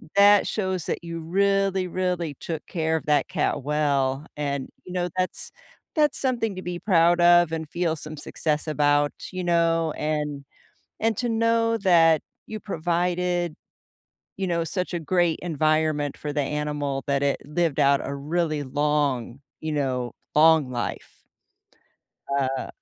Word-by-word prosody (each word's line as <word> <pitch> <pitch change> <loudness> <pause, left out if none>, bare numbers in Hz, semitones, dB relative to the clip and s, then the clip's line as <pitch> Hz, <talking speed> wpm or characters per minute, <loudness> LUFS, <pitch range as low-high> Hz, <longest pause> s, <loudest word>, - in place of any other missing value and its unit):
that 200 0 +6
shows 190 -4 -2
that - - -3
you 170 0 -5
really, 195 +2 +1
really 180 -4 -2
took 160 -2 -5
care 160 -1 -1
of 160 - -3
that 150 -2 +2
cat 175 -6 -1
well, 140 -2 0
and, 140 -2 -2 0.2
you 180 - -8
know, 180 -1 -1
that's 185 0 -2 0.4
that's 300 -2 +3
something 235 -6 -1
to - - -4
be 180 -1 -4
proud 175 -2 +3
of 175 -1 +6
and 160 -2 -4
feel 170 -1 -1
some 155 0 -7
success 155 +1 -2
about, 145 -1 +2 0.2
you 185 - -4
know, 165 -2 +2
and 150 -2 -2 0.6
and 225 -1 +1
to 240 -1 -1
know 230 0 +2
that 165 -6 +4 0.3
you 215 0 -6
provided, 175 -1 -1 0.8
you 190 -1 -2
know, 170 -1 0
such 180 +2 -3
a 175 - -1
great 170 +1 +1
environment 155 -2 0
for 150 -1 -5
the 145 - +1
animal 145 -1 -2
that 140 -1 +1
it 140 - +1
lived 155 0 0
out 140 -1 +4
a 140 - -4
really 155 +1 -1
long, 140 -3 0 0.2
you 155 - -4
know, 130 -5 -1 0.2
long 155 -3 +5
life. 120 -1 -5 1.1
Uh 135 -1 -1
160 Hz, 150 wpm, -25 LUFS, 145-180 Hz, 1.1 s, that